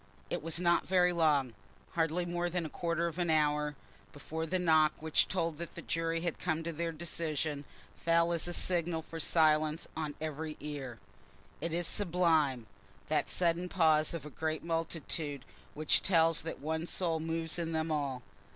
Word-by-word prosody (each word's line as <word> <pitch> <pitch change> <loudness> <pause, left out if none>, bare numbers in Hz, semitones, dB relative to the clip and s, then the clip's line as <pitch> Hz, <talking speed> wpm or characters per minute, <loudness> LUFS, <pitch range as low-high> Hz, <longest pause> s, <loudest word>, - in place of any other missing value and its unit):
It - - -1
was 165 +1 -1
not 175 -1 +2
very 180 -1 +4
long, 150 -7 +2 0.4
hardly 165 +1 0
more 175 0 -1
than 175 -1 -2
a - - -4
quarter 170 +1 -1
of 170 +1 -3
an 175 -1 0
hour, 150 -1 +2 0.4
before 160 +3 -5
the 185 - 0
knock 160 -3 +4
which 160 0 +2
told 165 -4 -2
that 170 - -6
the - - -6
jury 165 0 -1
had 170 -2 -2
come 165 -2 -1
to 165 0 -4
their 165 +2 -2
decision 155 -3 -2 0.4
fell 170 0 +3
as 170 0 0
a - - -2
signal 170 -2 +1
for 165 0 -8
silence 155 0 +3
on 155 -2 -3
every 155 0 -4
ear. 140 -5 -6 0.6
It 170 +1 -2
is 170 +1 +1
sublime—that 155 - 0
sudden 175 0 +1
pause 160 -3 +3
of 155 -4 -3
a 150 - -8
great 160 +2 -2
multitude 165 -4 -3 0.3
which 155 0 +3
tells 165 -3 +3
that 165 - -5
one 160 +3 -3
soul 170 -3 0
moves 165 +1 -1
in 165 -1 -2
them 160 0 -1
all. 140 -5 -2
160 Hz, 170 wpm, -32 LUFS, 155-170 Hz, 0.6 s, very